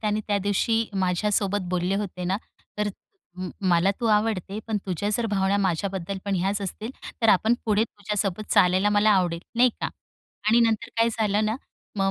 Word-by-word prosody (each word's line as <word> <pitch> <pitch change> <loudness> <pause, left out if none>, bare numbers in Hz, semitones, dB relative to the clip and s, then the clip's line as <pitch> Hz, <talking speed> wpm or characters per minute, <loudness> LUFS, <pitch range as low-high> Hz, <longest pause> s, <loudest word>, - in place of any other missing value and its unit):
त्यांनी 210 0 0
त्या 205 -1 +1
दिवशी 225 +3 +2 0.2
माझ्यासोबत 200 +2 +1
बोलले 180 +1 0
होते 185 -3 -4
ना, 185 +2 +1 0.4
तर 210 0 +1 0.5
म 185 0 -4 0.2
मला 175 +2 +4
तू 235 - 0
आवडते, 210 -2 +1
पण 220 -2 0
तुझ्या 190 +2 -2
जर 235 - -1
भावना 195 -2 +1
माझ्याबद्दल 190 0 -1
पण 200 -1 -1
ह्याच 195 +3 0
असतील, 215 +4 -4 0.3
तर 225 - +4
आपण 220 +4 +5
पुढे 215 0 +2
तुझ्यासोबत 205 -1 -3
चालायला 185 +3 +4
मला 210 +1 +4
आवडेल, 180 -4 +2
नाही 245 +1 +5
का? - - 0 0.6
आणि 230 +2 +5
नंतर 225 0 +1
काय 230 0 +4
झालं 210 -1 +2
ना 215 +2 0 0.4
मग 195 -1 +2
205 Hz, 175 wpm, -25 LUFS, 190-215 Hz, 0.6 s, आपण